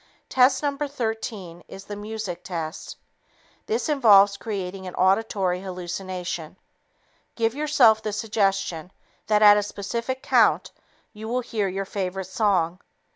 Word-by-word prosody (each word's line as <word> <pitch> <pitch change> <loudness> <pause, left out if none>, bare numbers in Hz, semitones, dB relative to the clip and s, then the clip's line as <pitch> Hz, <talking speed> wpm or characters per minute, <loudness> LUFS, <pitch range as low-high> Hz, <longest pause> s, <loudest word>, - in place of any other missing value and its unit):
Test 260 +2 +3
No. 285 -1 0
13 225 - -4
is 195 - -10
the 205 - -6
"music" 210 -3 -6
test. 165 -2 -6 0.7
This 445 +1 -1
test 305 - +1
involves 205 -7 +6
creating 195 -3 -5
an 180 - -7
auditory 190 -2 +1
hallucination. 180 -2 -5 0.8
Give 225 -1 0
yourself 265 -7 +4
the 215 - -3
suggestion 195 -5 -1 0.4
that 210 0 +3
at 205 0 +8
a - - +2
specific 235 +6 -4
count - - +3 0.4
you 215 0 -8
will 250 +2 -1
hear 220 -4 -2
your 195 +1 -3
favorite 190 -1 -4
song. 185 -3 0
205 Hz, 130 wpm, -24 LUFS, 185-225 Hz, 0.8 s, at